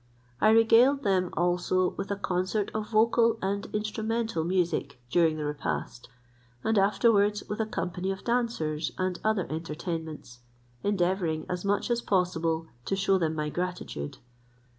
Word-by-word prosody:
I - - +6
regaled 225 +5 +5
them 185 -3 +2
also 180 +1 +1
with 195 - -6
a 200 - 0
concert 190 +2 -1
of 215 -1 -3
vocal 230 +1 +3
and 200 +1 -2
instrumental 220 -2 -1
music 170 -6 -1
during 165 -1 +3
the 150 - -3
repast, 145 -4 -4 0.5
and 220 - +1
afterwards 205 0 +3
with 210 - -4
a 220 - -1
company 180 -3 -3
of 195 0 -4
dancers, 230 -11 -1
and 185 -1 -1
other 215 -4 +1
entertainments, 160 -4 -5 0.4
endeavouring 175 -5 0
as 180 -1 -3
much 205 +4 0
as 240 0 +1
possible 165 -5 0 0.2
to 195 - 0
shew 195 0 +2
them 160 -2 0
my 150 -1 -2
gratitude. 175 - -4
185 Hz, 140 wpm, -28 LUFS, 165-215 Hz, 0.5 s, I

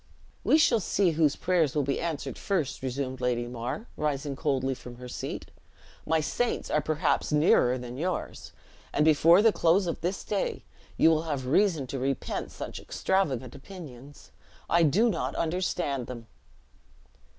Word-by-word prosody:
"We 305 - +5
shall 285 -8 +4
see 190 -2 +1
whose 155 -2 +2
prayers 170 -6 +1
will 145 - +2
be 140 +1 -1
answered 165 -4 -3
first," 170 -10 -2
resumed 130 0 -3
Lady 120 -1 0
Mar, 120 - -5
rising 145 -1 -2
coldly 135 -2 0
from 125 -1 -10
her 125 +1 -9
seat. - - -6 0.6
"My 160 +1 +3
saints 235 +10 -1
are 150 - +2
perhaps 155 +2 0
nearer 150 -4 +4
than 125 +1 -7
yours, 180 +3 -3 0.4
and 150 - +2
before 165 +5 +6
the 225 -2 +5
close 175 +4 +3
of 170 - -3
this 185 +3 -2
day 205 -2 -2 0.3
you 165 - +6
will 160 -1 +2
have 140 -4 -2
reason 160 +1 +2
to 135 +1 -5
repent 135 +1 -2
such - - -7
extravagant 135 -11 -1
opinions. 145 -4 -11 0.4
I 170 - +3
do 175 +9 +4
not 185 -8 -1
understand 165 -6 -1
them." 120 -2 -8
150 Hz, 155 wpm, -28 LUFS, 130-175 Hz, 0.6 s, before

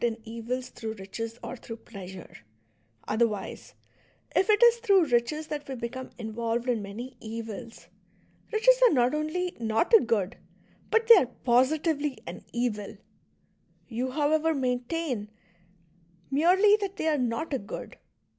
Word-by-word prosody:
in 230 -2 +1
evils 235 +3 -4
thi'ough 220 -1 -6
riches 225 +4 -6
or - - -5
through 230 -2 -8
pleasure; 190 -5 -10 0.7
other 230 +2 +3
wise, 205 -3 -7 0.6
if 385 - +3
it 425 +2 +5
is 475 0 +7
through 400 -7 +4
riches 265 +4 0
that 295 -1 -5
we 265 - -3
become 250 +2 -6
involved 230 +1 -3
in 240 -3 +1
many 235 +6 -7
evils, 225 0 -7 0.7
riches - - +4
are - - +1
not 245 +1 +3
only 315 +4 -2
not 225 - 0
a 450 - +10
good, 215 - 0 0.5
but 450 +1 +3
they 460 -1 +10
are 265 - +3 0.2
positively 285 +3 +2
an 170 - -8
evil. 230 -4 -2 0.9
You, 250 +2 -2
however, 310 +3 +1
maintain 250 -2 -2 1.0
merely 370 +9 +5
that 400 -2 -4
they 320 - -2
are 305 -2 +2
not 250 +6 -2
a 270 - 0
good. 200 - -8
250 Hz, 145 wpm, -28 LUFS, 230-315 Hz, 1.0 s, a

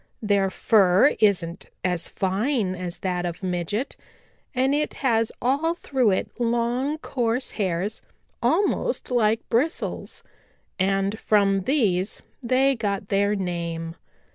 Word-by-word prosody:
Their 200 -3 +2
fur 200 +4 +4
isn't 180 -5 +1 0.2
as 180 -2 -1
fine 200 +2 0
as 180 -1 -5
that 180 -1 0
of 175 +2 -5
Midget, 185 - -2 0.6
and 260 +2 +2
it 300 +1 0
has 225 -2 +2
all 290 +7 +1
through 265 -8 +1
it 190 - 0
long 240 +5 0
coarse 245 -4 -1
hairs 195 +1 -2 0.4
almost 415 - +1
like 225 -2 +2
bristles, 275 +9 -2 0.6
and 195 +2 +1
from 195 -2 +2
these 210 -9 +1 0.2
they 265 +2 +3
get 200 -3 -3
their 200 +1 +2
name. 170 -3 -3
210 Hz, 115 wpm, -24 LUFS, 185-250 Hz, 0.6 s, fur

